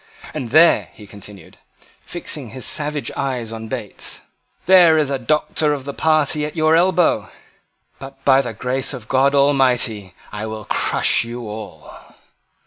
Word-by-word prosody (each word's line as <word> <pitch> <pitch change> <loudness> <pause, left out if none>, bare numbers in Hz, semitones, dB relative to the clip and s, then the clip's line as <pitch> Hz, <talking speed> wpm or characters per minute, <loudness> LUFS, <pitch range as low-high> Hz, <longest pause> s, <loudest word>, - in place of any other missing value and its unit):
And 135 -6 -5
there," 160 +6 +4
he 105 - -14
continued, 100 0 -13 0.4
fixing 150 -7 -4
his 130 +3 -7
savage 150 -1 -1
eye 130 -4 -3
on 110 0 -7
Bates, 110 -5 -6 0.4
"there 175 -4 +6
is 150 -3 0
a 135 - -1
Doctor 150 +3 0
of 135 -2 -6
the 140 - -5
party 155 -1 +1
at 150 +2 -5
your 155 0 +3
elbow. 175 0 +2 0.7
But, 135 +1 -12
by 135 0 +5
the 120 -4 -6
grace 130 +4 -2
of 115 -4 -11
God 135 +2 +2
Almighty, 125 -9 +1 0.2
I 105 +1 -5
will 110 -1 -7
crush - - +1
you 120 0 -7
all." 105 0 -11
135 Hz, 150 wpm, -19 LUFS, 115-150 Hz, 0.7 s, there